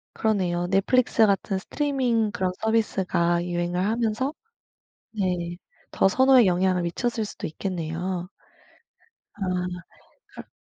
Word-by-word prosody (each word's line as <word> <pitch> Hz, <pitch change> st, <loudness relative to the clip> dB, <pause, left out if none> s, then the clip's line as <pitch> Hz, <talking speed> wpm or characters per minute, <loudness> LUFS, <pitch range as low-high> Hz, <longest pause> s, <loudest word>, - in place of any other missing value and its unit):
그러네요. 185 Hz, -5 st, 0 dB
Netflix 220 Hz, +5 st, +3 dB
같은 195 Hz, -1 st, 0 dB
스트리밍 245 Hz, -2 st, 0 dB
그런 185 Hz, -2 st, -1 dB
서비스가 190 Hz, -6 st, +1 dB
유행을 175 Hz, 0 st, -2 dB
하면서 230 Hz, +5 st, 0 dB, 0.9 s
네 175 Hz, -3 st, -1 dB, 0.4 s
더 -, -, +4 dB
선호에 260 Hz, +2 st, +5 dB
영향을 185 Hz, 0 st, +2 dB
미쳤을 220 Hz, +6 st, -2 dB
수도 -, -, -6 dB
있겠네요. 175 Hz, +1 st, -4 dB, 1.1 s
아 200 Hz, -, -4 dB, 0.9 s
그럼 -, -, -11 dB
195 Hz, 275 characters per minute, -25 LUFS, 175-225 Hz, 1.1 s, 선호에